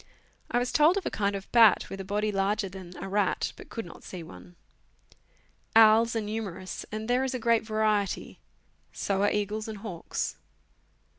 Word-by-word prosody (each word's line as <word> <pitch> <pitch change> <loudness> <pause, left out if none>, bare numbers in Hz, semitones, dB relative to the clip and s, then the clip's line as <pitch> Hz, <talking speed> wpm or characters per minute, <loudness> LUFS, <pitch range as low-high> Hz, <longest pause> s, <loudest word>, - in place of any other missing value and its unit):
I - - +1
was 245 +1 0
told 315 +5 +5
of 390 - -3
a - - -1
kind 200 -1 0
of 195 0 -7
bat, 230 -3 +6
with 195 - -5
a - - -5
body 210 +2 -1
larger 200 +1 0
than 185 -1 -10
a - - -6
rat, 200 -1 0
"but - - -13
could 225 - -5
not 170 - -12
see 180 -3 -7
one. 90 - -13 1.2
Owls 225 +1 +6
are 225 - +1
numerous, 205 -4 -5
and 215 +1 -4
there 250 +2 +2
is 265 -1 -2
a - - -2
great 230 -1 +3
variety; 215 -2 -1 0.5
so 195 -1 -1
are 205 - +4
eagles 210 +1 -2
and 220 -1 -6
hawks. 195 -5 -4
210 Hz, 180 wpm, -28 LUFS, 195-225 Hz, 1.2 s, bat